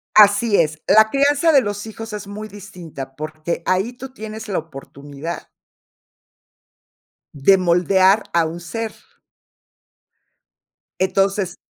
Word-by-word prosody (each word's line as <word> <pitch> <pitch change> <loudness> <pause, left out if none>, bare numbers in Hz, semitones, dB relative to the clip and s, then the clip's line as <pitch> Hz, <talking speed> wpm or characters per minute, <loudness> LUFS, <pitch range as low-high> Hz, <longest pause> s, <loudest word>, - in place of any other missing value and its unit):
Así 205 +1 +6
es, 155 -1 -2
la 220 +2 +6
crianza 285 +5 +3
de 280 -3 +6
los 205 -1 -4
hijos 225 0 -8
es 205 -1 -6
muy 210 +2 -7
distinta, 180 -10 -10
porque, 155 +3 -5
ahí 190 +6 0
tú 260 +1 -10
tienes 220 -2 -8
la 195 - -1
oportunidad 145 +1 -8 1.9
de 145 +8 +5
moldear 185 +3 +3
a 170 -1 +2
un 165 +2 -5
ser 220 +6 -5 2.1
entonces 195 -1 0
195 Hz, 115 wpm, -20 LUFS, 170-220 Hz, 2.1 s, Así